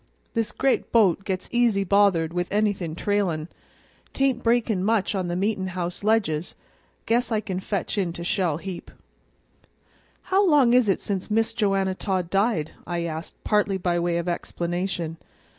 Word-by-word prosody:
This 225 -3 0
gre't 270 +4 0
boat 195 -5 +4
gets 185 -1 -3
easy 235 -5 +2
bothered 190 -5 +3
with 175 0 -2
anything 200 -6 0
trailin'. 180 -5 -1 0.6
'Tain't 270 -3 +1
breakin' 230 -5 +2
much 215 -1 +1
on 185 -3 -1
the 175 - -2
meetin' 195 0 -1
house 175 +2 -3
ledges; 200 -7 +1 0.5
guess 240 +1 +1
I 220 - +2
can 190 -4 -4
fetch 200 +1 -2
in 180 -3 0
to 170 - -6
Shell 175 -4 0
heap." 185 +1 -7 1.3
"How 385 +2 +2
long 275 -6 +5
is 250 -4 +4
it 195 - +1
since 195 -1 -3
Miss 225 +1 +1
Joanna 195 -4 +1
Todd 185 -3 -2
died?" 195 -6 +1 0.2
I 175 -1 -2
asked, 160 0 -5
partly 205 -2 +2
by 175 -1 0
way 170 0 0
of 170 +1 -3
explanation. 175 -1 -3
195 Hz, 160 wpm, -25 LUFS, 175-220 Hz, 1.3 s, long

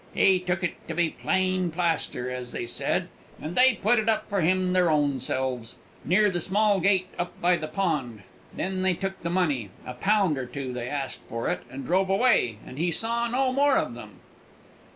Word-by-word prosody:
He 190 -1 +4
took 180 +1 -2
it 180 - 0
to 165 - -4
be 170 -1 +1
plain 185 -1 0
plaster, 165 -7 -1
as 125 -1 -6
they - - -3
said, 115 - -1 0.3
and 155 - -5
they 255 +1 +5
put 220 +3 +2
it 220 +1 0
up 220 - 0
for 200 -2 0
him 185 +2 +2
their 180 -2 +3
own 145 -3 +2
selves, 125 -3 -3 0.3
near 205 +5 +3
the 175 - -1
small 200 +3 +2
gate 185 -1 +2
up 175 0 -4
by 180 +1 +3
the 155 -2 -5
road; 135 - -1 0.3
then 185 0 -3
they 185 -1 +2
took 190 +1 -4
the 170 - -3
money 150 - 0 0.2
a 125 - -6
pound 190 +1 +2
or 130 - -4
two 130 -1 -5
they 125 0 -4
asked 140 -2 -3
for 115 +1 -2
it - - -2
and 135 +1 -7
drove 190 +4 +1
away, 195 - +3
and 130 - -9
he 175 +2 +1
saw 230 +7 0
no 255 +2 +1
more 280 0 +4
of 120 - -1
them." 105 -4 -11
175 Hz, 205 wpm, -26 LUFS, 135-195 Hz, 0.3 s, they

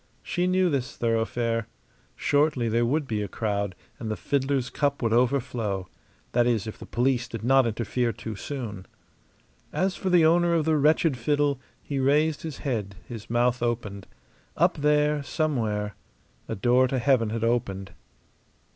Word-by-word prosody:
She 175 +1 -1
knew 185 -1 +2
this 135 -3 -2
thoroughfare. 115 0 0 0.5
Shortly 145 -4 +2
there 115 +1 +2
would 145 +2 0
be 110 -3 -1
a 105 - -2
crowd, 100 -2 -2 0.2
and 110 - -4
the 110 - -2
fiddler's 135 -2 0
cup 140 -2 0
would 115 -1 +2
overflow 120 -6 0 0.4
that 120 0 +3
is, 115 -3 +1
if 110 - -7
the - - -10
police 125 0 +1
did 115 -2 -7
not 135 0 +4
interfere 115 +2 -1
too 110 -1 -7
soon. 105 -5 -6 0.8
As 190 +1 0
for 190 - -2
the 175 -3 +5
owner 170 +1 +4
of 160 -2 +1
the 160 -1 +3
wretched 150 -1 +3
fiddle, 145 +1 +1 0.2
he 140 -2 -3
raised 150 +3 +2
his 160 -4 -6
head, 105 -7 -2
his 115 -4 -8
mouth 120 +1 +2
opened. 110 -5 -2 0.5
Up 175 +1 +3
there, 150 0 +2
somewhere, 115 -10 -1 0.5
a 115 - -3
door 125 +5 +3
to 130 - -1
heaven 125 -3 +2
had 115 +1 -3
opened. 100 -5 -1
125 Hz, 160 wpm, -26 LUFS, 115-145 Hz, 0.8 s, the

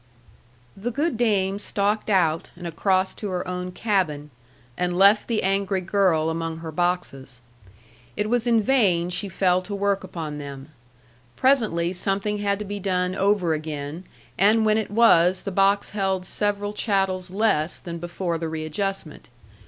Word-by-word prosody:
The 205 +5 -4
good 290 +5 -1
dame 200 -4 +1
stalked 205 +1 -1
out, 165 -5 +2
and 175 0 -10
across 185 +3 +1
to 210 - -5
her 180 0 -3
own 180 0 -4
cabin, 180 -8 -1 0.4
and 180 0 -1
left 200 +3 +5
the 230 -2 0
angry 195 0 +1
girl 175 -4 +2
among 165 0 -3
her 165 -1 -7
boxes. 155 -7 -2 0.8
It 210 - 0
was 240 +1 0
in 230 -2 +3
vain 190 -9 +2
she 195 +3 -2
fell 185 0 +2
to 200 +2 -6
work 200 -1 0
upon 160 -5 -6
them. 140 0 -8 0.7
Presently 215 -11 +2
something 195 +3 -1
had 200 -1 0
to 210 - -6
be 205 +1 -5
done 180 -1 0
over 195 -3 +1
again, 155 +1 -5 0.4
and 215 +3 +4
when 215 0 +3
it 220 - -4
was 190 -5 +4
the 200 - -5
box 195 +2 +2
held 190 -2 -1
several 205 +1 -1
chattels 195 -4 0
less 185 -5 +1
than 170 -1 -7
before 175 0 -3
the 165 -1 -3
readjustment. 160 +1 -4
190 Hz, 155 wpm, -24 LUFS, 170-205 Hz, 0.8 s, left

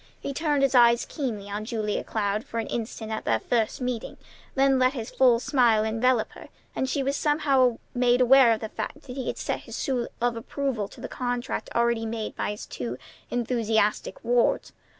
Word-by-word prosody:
He 280 - -4
turned 295 -2 +1
his 275 - +3
eyes 235 -1 +5
keenly 230 -9 -4
on 205 +1 -4
Julia 215 -2 -2
Cloud 210 0 -1
for 230 - -7
an 225 - -1
instant 220 -1 -5
at 220 - -3
their 110 - +1
first 225 - 0
meeting, 250 -2 -3 0.4
then 270 -1 +4
let 255 +1 +3
his 230 -5 -5
full 250 -3 +4
smile 240 -4 +3
envelop 225 +2 +1
her, - - -13 0.3
and 260 - -1
she 275 +1 0
was 275 +1 0
somehow 275 -6 +2 0.2
made 245 0 +3
aware 255 -1 +7
of 220 - -4
the 220 - -4
fact 295 - -6
that 250 -2 -9
he 265 - -4
had - - -2
set - - -2
his - - -9
seal 250 -3 -1
of 240 0 +1
approval 235 -2 -3
to - - -14
the - - -4
contract 245 -1 -3
already 235 -1 +1
made 220 -1 -4
by - - -2
his 210 0 -5
two 120 0 -5 0.3
enthusiastic 225 -3 0
wards. 240 0 +1
240 Hz, 195 wpm, -26 LUFS, 220-260 Hz, 0.4 s, aware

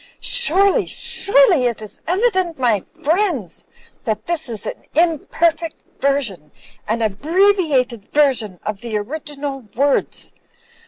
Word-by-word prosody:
Surely, 395 -4 +3
surely, 400 - +3
it 235 - -3
is 215 -1 -9
evident, 370 -3 +1
my 240 -5 +2
f 190 - -12 0.2
riendss, 315 - 0 0.4
that 220 -4 -2
this 320 -5 -2
is 220 -3 -5
an - - -6
imperfect 330 0 +1 0.2
version, 235 - 0 0.4
an 225 +2 0
abbreviated 280 - +2
version, 250 -10 +2
of 210 -2 -4
the 230 -3 -2
original 280 +2 -5
words. 280 +3 0
280 Hz, 115 wpm, -19 LUFS, 225-340 Hz, 0.4 s, Surely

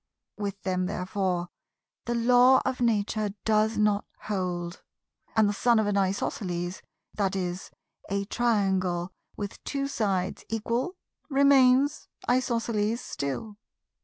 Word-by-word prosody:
With 200 -2 -4
them 185 -1 0
therefore 185 -2 -2 0.6
the 240 - -1
Law 250 +2 +5
of 260 -1 -1
Nature 215 -2 +1
does 220 0 +2
not 210 -1 +2 0.2
hold; 180 -3 -3 0.5
and 220 -2 +5
the 205 - +1
son 235 +3 +3
of 220 - +3
an 205 -1 0
Isosceles 185 -2 -1 0.4
(i.e. 190 -3 0 0.5
a 200 0 -1
Triangle 190 -6 +1 0.3
with 205 -1 -6
two 275 -1 -2
sides 200 -9 -1
equal) 235 - -1 0.3
remains 275 0 +4 0.2
Isosceles 230 -3 +1
still. 205 - -4
210 Hz, 110 wpm, -27 LUFS, 190-240 Hz, 0.6 s, Law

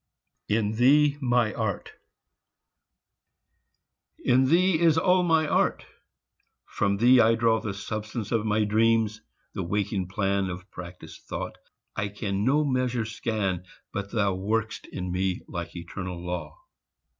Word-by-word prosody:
IN 105 0 0
THEE 145 +4 +4
MY 120 -4 +2
ART 110 -4 -3 2.3
In 130 +2 +3
thee 170 +3 +3
is 165 -2 +4
all 180 +2 +4
my 160 -3 +2
art; - - +1 0.8
from 100 0 0
thee 125 +4 +6
I 115 +1 +4
draw 115 -1 +2
The 100 -2 -4
substance 110 +1 -5
of 115 -2 +1
my 110 0 +1
dreams, 110 0 +2 0.3
the - - -3
waking 100 +1 -1
plan 100 0 0
Of 90 +2 -8
practised 90 -2 -10
thought; - - -5 0.4
I 100 - -1
can 100 -1 -3
no 145 +5 +3
measure 125 -4 0
scan, 105 -4 -2 0.3
But 100 0 -4
thou 100 -4 +1
work'st 110 +4 -2
in 90 0 -5
me 95 0 -1
like 85 -1 -6
eternal 90 +1 -6
law. 85 -4 -5
110 Hz, 135 wpm, -26 LUFS, 95-120 Hz, 2.3 s, thee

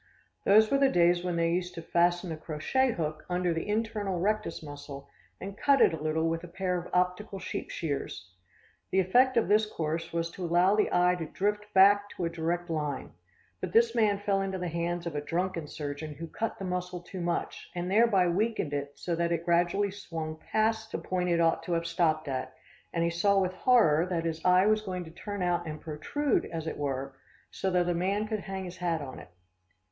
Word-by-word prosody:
Those 215 +2 +6
were 275 - +3
the 275 -1 +5
days 175 -2 +3
when 180 -1 -1
they 165 0 +1
used 180 +1 -2
to 165 - -5
fasten 175 +1 +1
a - - -2
crochet 165 - 0
hook 155 -4 -3
under 180 -1 +1
the 165 - -3
internal 210 -4 -1
rectus 210 -3 -1
muscle 145 -1 -9 0.3
and 195 +1 -6
cut 275 +5 +3
it - - +5
a 160 - -5
little 155 +1 0
with 165 +1 -2
a - - -7
pair 180 +1 -2
of 175 - -9
optical 180 +3 0
sheep - - -5
shears. 140 - -4 0.6
The 190 - +2
effect 245 +8 +4
of 230 - +3
this 210 +2 +4
course 165 -3 -3
was 165 0 -2
to 185 - -7
allow 175 +4 +3
the 210 - +2
eye 180 0 +4
to 165 - -4
drift 210 +4 -2
back 205 +1 +6
to 175 - -1
a 165 - -2
direct 170 +1 -2
line; 150 -5 -3 0.5
but 185 -1 -5
this 230 0 +5
man 215 -4 +3
fell 200 -1 0
into 190 -1 -2
the 180 -1 -3
hands 170 +1 -2
of 170 - -3
a 145 - -2
drunken 170 +1 -2
surgeon 145 +1 -6
who 165 +4 -6
cut 220 +7 -4
the 195 - -5
muscle 180 -1 -3
too 185 +1 -7
much, 170 0 -3
and 175 +1 -3
thereby 205 -4 +4
weakened 190 -4 0
it 145 0 -4
so 175 - -2
that 170 0 0
it 170 0 -1
gradually 175 +4 +2
swung 160 -5 -6
past 220 0 +1
the - - -2
point 180 -1 -2
it 170 -1 +2
ought 165 -1 +3
to 170 +1 -3
have 165 0 0
stopped 165 -2 +1
at, 130 -1 -4 0.4
and 170 - 0
he 170 - +1
saw 195 +4 +3
with 185 -1 0
horror 185 -7 +4
that 170 -2 -2
his 160 -1 -3
eye 180 +1 +5
was 215 0 +3
going 185 -3 -4
to 160 - -11
turn 200 +3 -5
out 175 -1 0
and 155 -1 -5
protrude, 205 - -1
as 160 -1 -5
it 160 - -4
were, 135 -1 -3 0.4
so 190 - -2
that 180 -1 +2
a 175 - +2
man 195 +5 0
could 215 -1 -2
hang 195 -1 -5
his 180 0 -8
hat 170 -2 -1
on 135 -3 -7
it. - - -13
175 Hz, 220 wpm, -29 LUFS, 165-195 Hz, 0.6 s, Those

